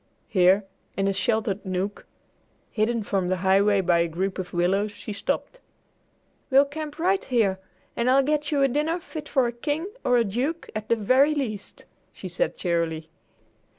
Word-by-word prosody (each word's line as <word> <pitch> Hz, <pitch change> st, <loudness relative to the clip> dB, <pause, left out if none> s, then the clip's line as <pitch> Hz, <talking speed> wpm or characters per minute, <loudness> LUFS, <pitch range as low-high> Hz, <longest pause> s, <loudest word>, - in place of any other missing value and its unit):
Here, 190 Hz, +1 st, +4 dB, 0.3 s
in 195 Hz, 0 st, +1 dB
a 195 Hz, -, +1 dB
sheltered 205 Hz, 0 st, 0 dB
nook, 190 Hz, +2 st, -3 dB, 0.6 s
hidden 225 Hz, +1 st, 0 dB
from 195 Hz, -3 st, -1 dB
the 185 Hz, -, +1 dB
highway 195 Hz, +2 st, +3 dB
by 175 Hz, -2 st, +3 dB
a 170 Hz, -, +2 dB
group 190 Hz, +4 st, -3 dB
of 185 Hz, -, -5 dB
willows, 190 Hz, +4 st, +1 dB
she 205 Hz, +1 st, -7 dB
stopped. 220 Hz, -, -3 dB, 0.9 s
"We'll 275 Hz, +1 st, +6 dB
camp 295 Hz, +1 st, -6 dB
right 375 Hz, +4 st, +1 dB
here, 215 Hz, -7 st, +1 dB, 0.4 s
and 235 Hz, +1 st, +1 dB
I'll 270 Hz, +1 st, +5 dB
get 300 Hz, +1 st, 0 dB
you 285 Hz, -2 st, +2 dB
a -, -, +5 dB
dinner 300 Hz, +6 st, 0 dB
fit 310 Hz, -3 st, -8 dB
for 265 Hz, -3 st, +3 dB
a 235 Hz, -, -1 dB
king 290 Hz, +7 st, -3 dB, 0.2 s
or 250 Hz, -, +3 dB
a 235 Hz, -, +4 dB
duke, 255 Hz, +11 st, -3 dB
at 215 Hz, 0 st, -5 dB
the 230 Hz, -, +4 dB
very 260 Hz, +8 st, +3 dB
least," 215 Hz, -8 st, -5 dB, 0.3 s
she -, -, -8 dB
said -, -, -2 dB
cheerily. 165 Hz, -2 st, -2 dB
215 Hz, 175 wpm, -25 LUFS, 190-280 Hz, 0.9 s, We'll